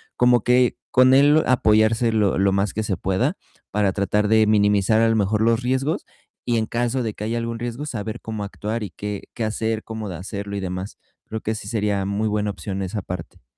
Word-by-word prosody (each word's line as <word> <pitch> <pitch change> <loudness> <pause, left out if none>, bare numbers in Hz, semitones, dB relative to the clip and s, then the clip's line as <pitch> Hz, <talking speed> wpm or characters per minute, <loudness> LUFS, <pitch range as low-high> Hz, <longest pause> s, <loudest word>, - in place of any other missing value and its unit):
como 125 -2 +4
que, 125 0 +3 0.2
con 130 +1 +6
él, 145 +3 +6
apoyarse 110 -1 +3
lo 105 -4 +2
lo 95 0 +3
más 100 0 +1
que 110 - -2
se 100 -4 -2
pueda, 95 - 0 0.4
para 105 -2 +2
tratar 105 +1 +1
de 110 0 +4
minimizar 105 +1 +3
a 115 - +4
lo 115 - +2
mejor 105 0 +1
los 115 +2 +2
riesgos 130 +4 -1 0.4
y 120 -1 +2
en 110 -1 0
caso 120 +2 -1
de 110 -3 -3
que 105 - -6
haya 115 +2 -1
algún 115 0 -3
riesgo, 120 +5 -5
saber 110 -2 -4
cómo 110 -2 -5
actuar 105 +3 -4
y 100 - -6
qué 105 -1 -5
qué 115 - -4
hacer, 110 0 -1
cómo 110 -1 -6
de 85 - -5
hacerlo 100 +1 -6
y 100 - -2
demás. 95 +1 -5 0.3
Creo 110 0 -5
que 110 - -2
sí 100 - -7
sería 105 -3 0
muy 100 +2 -1
buena 105 -1 0
opción 95 0 -5
esa 95 +2 -3
parte. 90 -7 -8
110 Hz, 215 wpm, -22 LUFS, 100-115 Hz, 0.4 s, con